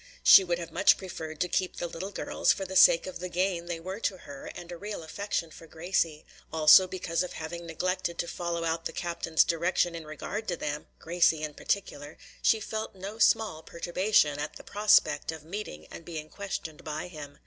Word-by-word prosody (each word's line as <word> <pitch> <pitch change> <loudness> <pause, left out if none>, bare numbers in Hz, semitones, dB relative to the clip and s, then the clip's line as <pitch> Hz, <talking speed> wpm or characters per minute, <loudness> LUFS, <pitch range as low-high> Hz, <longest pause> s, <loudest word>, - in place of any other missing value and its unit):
She 195 - +9
would 175 -2 -1
have 170 -1 -7
much - - +5
preferred 160 -5 -7
to 180 - +2
keep 185 +1 -1
the - - -3
little 170 +3 -6
girls, - - +1
for 195 - -2
the 190 0 -7
sake 165 - +7
of 185 - -7
the 180 +1 -5
gain 175 -1 -1
they 170 -1 -3
were 190 +5 -6
to 200 -4 -1
her 140 -5 -10
and 175 0 -9
a - - -5
real 205 -1 -6
affection 170 -1 -3
for 165 - -13
Gracie; 165 -2 -1 0.3
also 160 +4 +7
because 180 -2 -2
of 180 - -4
having 170 +2 -6
neglected 175 +1 -2
to 170 - -2
follow 170 -1 -3
out 165 0 -1
the - - -3
captain's 170 -2 +1
directions 170 +1 0
in 165 -2 -8
regard 200 +8 -5
to 175 - -1
them 150 0 -4
Gracie 165 -2 +2
in 150 -1 -4
particular 150 -5 -3 0.2
she 220 - +4
felt 215 -1 -5
no 200 +4 -7
small 220 -8 +3
perturbation 170 -3 +1
at 150 +1 -4
the - - -11
prospect 205 -8 +3
of 160 -2 -9
meeting 200 +7 -7
and - - -9
being 155 -2 -7
questioned 180 -6 -6
by 155 +1 -4
him. 145 -4 -10
170 Hz, 205 wpm, -29 LUFS, 160-190 Hz, 0.3 s, She